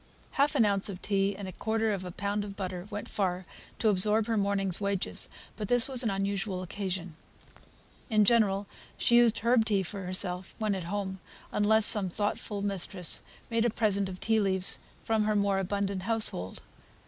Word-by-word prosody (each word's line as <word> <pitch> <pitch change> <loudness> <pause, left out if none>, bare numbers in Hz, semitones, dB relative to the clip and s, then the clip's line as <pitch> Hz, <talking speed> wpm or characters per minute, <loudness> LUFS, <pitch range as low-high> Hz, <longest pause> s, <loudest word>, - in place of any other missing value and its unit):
Half 290 +2 +1
an 235 -6 +4
ounce 200 0 +1
of 185 -2 -7
tea 200 0 0
and 200 - -7
a - - -6
quarter 220 +3 -1
of 195 -2 -3
a 180 - -6
pound 200 +3 -3
of 200 -1 -8
butter 185 -1 -5
went 205 -1 -6
far 185 -2 -2 0.3
to 225 - 0
absorb 210 +2 +3
her 230 0 -1
morning's 200 -2 +1
wages; 200 -1 -1 0.3
but 210 -2 -5
this 245 +1 +4
was 260 -3 +5
an 230 - 0
unusual 195 -1 -2
occasion. 185 -2 -5 0.9
In 215 -2 +3
general, 205 -3 +2 0.3
she 235 - +3
used 235 -2 +4
herb 235 -1 +4
tea 205 -3 0
for 195 +2 -6
herself, 180 0 -2
when 215 -2 -1
at 185 -3 -4
home, 190 0 -4 0.3
unless 215 +1 +4
some 200 -3 +5
thoughtful 205 +1 -3
mistress 195 -2 0 0.3
made 230 0 +1
her - - +3
a - - -1
present 200 -4 0
of 185 -1 -8
tea 225 0 +1
leaves 190 -2 +2 0.2
from 220 -1 0
her 215 0 +1
more 200 -1 +1
abundant 195 0 -2
household. 215 - +1
200 Hz, 185 wpm, -29 LUFS, 190-215 Hz, 0.9 s, was